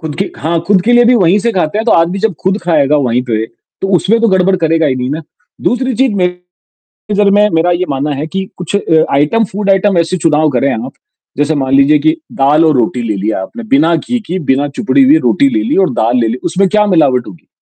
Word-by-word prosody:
खुद 155 -3 -6
के 195 - -2
हाँ, 165 +3 -1
खुद 195 -3 +2
के 240 - +1
लिए 240 0 +5
भी 245 +1 +4
वहीं 190 -2 +3
से 230 +3 -1
खाते 185 +1 -1
हैं 220 - -2
तो - - +3
आदमी 170 +3 +1
जब 215 -1 -1
खुद 190 +2 -1
खाएगा 150 -4 +1
वहीं 125 -3 0
पे, 110 -3 -2
तो 120 +11 -9
उसमें 220 +6 +1
तो 230 - +2
गड़बड़ 190 0 +2
करेगा 165 -2 +1
ही 135 - 0
नहीं 125 0 -3
ना, 155 +3 -4 0.4
दूसरी 255 +1 -1
चीज 265 -2 +1
मेरी 180 -1 -1 0.7
नजर 205 0 +2
में 205 +1 +3
मेरा 165 +2 +2
यह 175 +1 -1
मानना 140 +2 -2
है 145 +3 -4
कि 190 +4 -4
कुछ 180 +2 -3
अ, 160 -5 +2
आइटम 150 +11 +2
फूड 200 +1 -2
आइटम 195 -1 +2
ऐसे 170 +2 0
चुनाव 155 -2 +1
करें 135 +1 0
आप। 110 - -5 0.4
जैसे 145 +3 0
मान 135 -2 -2
लीजिए 140 +2 +4
कि 315 - +2 0.2
दाल 145 +4 +2
और 155 -3 +2
रोटी 120 0 -1
ले 105 - -1
लिया 100 +1 -2
आपने, 235 - -9
बिना 160 +5 +3
घी 245 +10 -3
की, 180 +3 -3
बिना 145 -3 0
चुपड़ी 205 - 0
हुई 285 +4 +5
रोटी 280 - +3
ले 320 - 0
ली 265 - -1
और - - -3
दाल 115 +3 0
ले 115 - +1
ली, 115 - -2
उसमें 195 +1 0
क्या 210 +1 +2
मिलावट 140 -10 +2
होगी? 90 -5 -14
165 Hz, 245 wpm, -12 LUFS, 140-200 Hz, 0.7 s, लिए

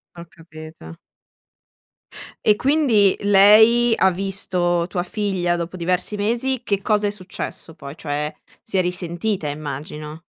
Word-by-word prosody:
Ho 170 - -9
capito. 155 - -12 1.5
E 210 - +5
quindi 255 -8 +3
lei 215 +4 +5
ha 190 - +3
visto 180 -2 -1
tua 175 - -2
figlia 180 -2 -1
dopo 170 +2 -6
diversi 180 +4 -1
mesi, 235 +5 -1
che 200 -4 -2
cosa 210 0 +1
è - - 0
successo 185 -4 -7
poi? 140 -2 -11
Cioè, 150 -1 -3 0.3
si 220 - -5
è 185 - +3
risentita, 180 0 -2
immagino. 150 +1 -7
185 Hz, 130 wpm, -21 LUFS, 165-210 Hz, 1.5 s, E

